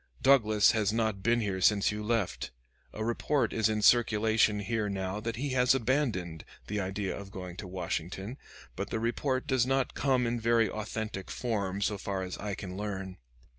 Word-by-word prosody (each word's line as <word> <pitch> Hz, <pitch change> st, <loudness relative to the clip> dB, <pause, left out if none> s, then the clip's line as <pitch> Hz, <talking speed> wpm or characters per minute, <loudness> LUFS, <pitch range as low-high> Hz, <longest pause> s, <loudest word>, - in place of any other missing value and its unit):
Douglas 110 Hz, -6 st, +5 dB
has 110 Hz, -3 st, +1 dB
not 110 Hz, -3 st, 0 dB
been 120 Hz, +3 st, +2 dB
here 95 Hz, -3 st, -2 dB
since 100 Hz, +2 st, +4 dB
you 105 Hz, 0 st, -4 dB
left. 110 Hz, -4 st, -1 dB, 0.4 s
A 110 Hz, -, -4 dB
report 120 Hz, +1 st, 0 dB
is 110 Hz, -1 st, +2 dB
in 105 Hz, -1 st, -1 dB
circulation 110 Hz, -2 st, +4 dB
here 110 Hz, 0 st, -1 dB
now 95 Hz, 0 st, -3 dB
that 115 Hz, +2 st, -3 dB
he 140 Hz, +5 st, -2 dB
has 125 Hz, 0 st, +3 dB
abandoned, 115 Hz, -, -1 dB, 0.2 s
the 105 Hz, 0 st, -2 dB
idea 95 Hz, +1 st, -3 dB
of 100 Hz, -1 st, -8 dB
going 90 Hz, -3 st, -7 dB
to 100 Hz, -, -6 dB
Washington; 95 Hz, -, -4 dB, 0.4 s
but -, -, -4 dB
the 110 Hz, -, -2 dB
report 130 Hz, +3 st, -1 dB
does 130 Hz, -2 st, +2 dB
not 135 Hz, 0 st, +1 dB
come 130 Hz, -3 st, +1 dB
in 120 Hz, 0 st, -1 dB
very 115 Hz, 0 st, +3 dB
authentic 110 Hz, -1 st, -5 dB
form 100 Hz, -5 st, -2 dB
so 105 Hz, -1 st, -1 dB
far 95 Hz, -1 st, -3 dB
as 90 Hz, 0 st, -5 dB
I 100 Hz, -1 st, -3 dB
can 95 Hz, -2 st, -7 dB
learn. 95 Hz, -2 st, -5 dB
105 Hz, 180 wpm, -30 LUFS, 95-120 Hz, 0.4 s, Douglas